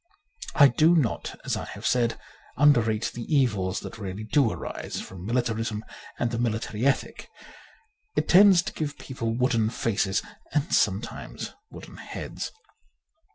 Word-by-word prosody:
I 145 Hz, -, +8 dB
do 155 Hz, +6 st, +4 dB
not, 140 Hz, -10 st, -1 dB
as -, -, 0 dB
I -, -, -4 dB
have -, -, -9 dB
said, 120 Hz, -2 st, +1 dB, 0.4 s
underrate 120 Hz, -6 st, +3 dB
the 120 Hz, -, -6 dB
evils 105 Hz, -10 st, +1 dB
that 115 Hz, -, -8 dB
really 100 Hz, +1 st, -5 dB
do 115 Hz, +3 st, +3 dB
arise -, -, -5 dB
from 95 Hz, 0 st, -8 dB
mili 120 Hz, +2 st, +2 dB
tarism 115 Hz, -2 st, -2 dB, 0.4 s
and 120 Hz, -, 0 dB
the 115 Hz, -, -2 dB
military 115 Hz, 0 st, -1 dB
ethic. 135 Hz, -, -1 dB, 0.9 s
It -, -, 0 dB
tends 190 Hz, -1 st, +7 dB
to -, -, -5 dB
give 150 Hz, -2 st, -4 dB
people 115 Hz, -4 st, -4 dB
wooden 115 Hz, -4 st, +2 dB
faces 105 Hz, -4 st, 0 dB, 0.3 s
and 150 Hz, +1 st, 0 dB
sometimes 105 Hz, 0 st, -1 dB, 0.2 s
wooden -, -, -11 dB
heads. -, -, -6 dB
115 Hz, 145 wpm, -26 LUFS, 110-140 Hz, 0.9 s, I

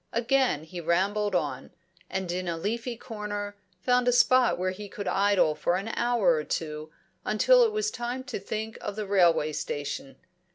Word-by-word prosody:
Again 240 Hz, -, +2 dB
he 175 Hz, +2 st, -7 dB
rambled 195 Hz, +4 st, +1 dB
on, -, -, -2 dB, 0.4 s
and 190 Hz, -2 st, -3 dB
in 180 Hz, +1 st, -3 dB
a 170 Hz, -1 st, -2 dB
leafy 230 Hz, +6 st, -3 dB
corner 205 Hz, -2 st, -5 dB, 0.3 s
found 250 Hz, +1 st, +2 dB
a -, -, +6 dB
spot 250 Hz, 0 st, +4 dB
where 185 Hz, +1 st, -1 dB
he 200 Hz, +2 st, -8 dB
could 200 Hz, -1 st, -6 dB
idle 195 Hz, -4 st, +3 dB
for 175 Hz, +3 st, 0 dB
an 195 Hz, +4 st, -3 dB
hour 235 Hz, -5 st, +2 dB
or 155 Hz, -2 st, +1 dB
two, 155 Hz, 0 st, -4 dB, 0.3 s
until -, -, +5 dB
it 455 Hz, -, +2 dB
was 430 Hz, 0 st, -1 dB
time 245 Hz, +2 st, -4 dB
to 260 Hz, -5 st, -5 dB
think 220 Hz, +3 st, -5 dB
of 205 Hz, -, -4 dB
the 215 Hz, -1 st, -3 dB
railway 175 Hz, -6 st, +3 dB
station. 145 Hz, -2 st, -4 dB
205 Hz, 175 wpm, -27 LUFS, 175-240 Hz, 0.4 s, a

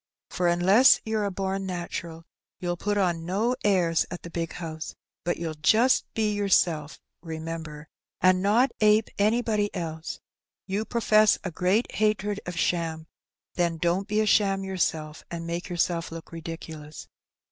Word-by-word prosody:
For, 180 Hz, -, 0 dB
unless 190 Hz, +10 st, +6 dB
youVe 220 Hz, -1 st, 0 dB
a -, -, -1 dB
born 195 Hz, 0 st, -3 dB
natural, 170 Hz, -2 st, -5 dB, 0.4 s
you'll 175 Hz, -1 st, -2 dB
put 205 Hz, +4 st, -1 dB
on 175 Hz, -4 st, +1 dB
no 210 Hz, +8 st, 0 dB
airs 175 Hz, -5 st, +3 dB
at 175 Hz, -, -7 dB
the 170 Hz, -, -8 dB
big 165 Hz, -1 st, -3 dB
house; 160 Hz, -2 st, -6 dB, 0.3 s
but 175 Hz, -, -1 dB
you'll 165 Hz, -2 st, -3 dB
just 220 Hz, +12 st, +3 dB
be 215 Hz, -2 st, +1 dB
your 205 Hz, -1 st, -1 dB
self, 155 Hz, -5 st, +2 dB, 0.2 s
remember, 160 Hz, -2 st, -6 dB, 0.3 s
and 185 Hz, 0 st, +4 dB
not 225 Hz, +7 st, +3 dB
ape 215 Hz, +1 st, +4 dB
anybody 215 Hz, -1 st, +2 dB
else; 160 Hz, -3 st, -5 dB, 0.5 s
you 205 Hz, +3 st, -2 dB
profess 215 Hz, -2 st, +4 dB
a 185 Hz, -, -3 dB
great 185 Hz, +7 st, +1 dB
hatred 210 Hz, -1 st, 0 dB
of 175 Hz, -1 st, -5 dB
sham, 165 Hz, -3 st, -1 dB, 0.5 s
then 170 Hz, -2 st, 0 dB
don't 175 Hz, +4 st, 0 dB
be 210 Hz, 0 st, 0 dB
a -, -, +1 dB
sham 195 Hz, -2 st, +3 dB
yourself, 160 Hz, -5 st, -2 dB
and 170 Hz, -1 st, -5 dB
make 170 Hz, +2 st, -4 dB
yourself 170 Hz, -1 st, -1 dB
look 165 Hz, 0 st, -9 dB
ridiculous. 160 Hz, -2 st, -8 dB
180 Hz, 155 wpm, -26 LUFS, 165-205 Hz, 0.5 s, unless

